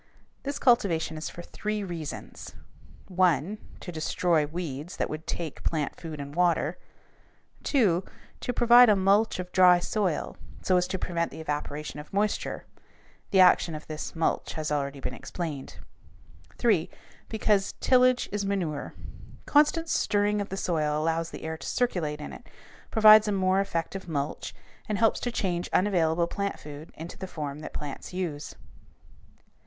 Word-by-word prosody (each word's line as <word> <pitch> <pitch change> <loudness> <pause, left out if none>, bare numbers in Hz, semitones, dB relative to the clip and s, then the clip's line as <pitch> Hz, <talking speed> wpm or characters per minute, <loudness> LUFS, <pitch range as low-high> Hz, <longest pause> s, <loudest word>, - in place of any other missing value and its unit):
This 280 0 -3
cultivation 175 - +2
is 155 - -4
for 175 - -9
three 210 +2 -3
reasons: 170 -5 -7 0.5
1. 185 +1 +1 0.2
To 180 - -6
destroy 160 -1 +1
weeds 160 0 -5
that - - -1
would 155 +1 -6
take 160 -4 -4
plant 155 -4 -1
food 160 -3 -8
and 140 0 -7
water. 175 -1 +1 0.9
2. 195 - +3 0.4
To - - -2
provide 240 0 +7
a 210 - +6
mulch 200 +3 +3
of 180 0 -6
dry 180 -1 +7
soil 185 -1 -1 0.3
so 185 - +3
as 180 0 +2
to 190 +1 -2
prevent 170 -2 -1
the - - -10
evaporation 150 -1 -4
of 150 - -11
moisture. 205 +1 -1 0.6
The 190 - +5
action 180 -2 +5
of 155 - -8
this 155 +1 -6
mulch 160 - 0
has 155 -1 -3
already 140 -1 -1
been 130 - -4
explained. 150 -1 -6 0.8
3. 205 -9 +2 0.4
Because 210 -3 +1
"tillage 255 -1 +4
is 205 0 -1
manure." 180 -7 -2 0.5
Constant 305 +3 +3
stirring 205 -7 +1
of 200 - -5
the 195 - -4
soil 155 -5 0
allows 165 +1 0
the - - -9
air 160 0 -4
to - - -8
circulate 170 -12 -1
in - - -7
it, - - -12 0.4
provides 215 -1 +8
a - - +1
more 190 -1 +2
effective 190 0 -3
mulch, 145 -2 -3 0.3
and 210 - 0
helps 225 0 +3
to 245 - -2
change 180 -6 -2
unavailable 170 -4 +2
plant 200 +3 -3
food 150 +1 -10
into 165 +2 -9
the 190 - -5
form 150 -4 -5
that 155 - -7
plants 145 -2 -6
use. 165 -5 -4
175 Hz, 155 wpm, -27 LUFS, 155-205 Hz, 0.9 s, provides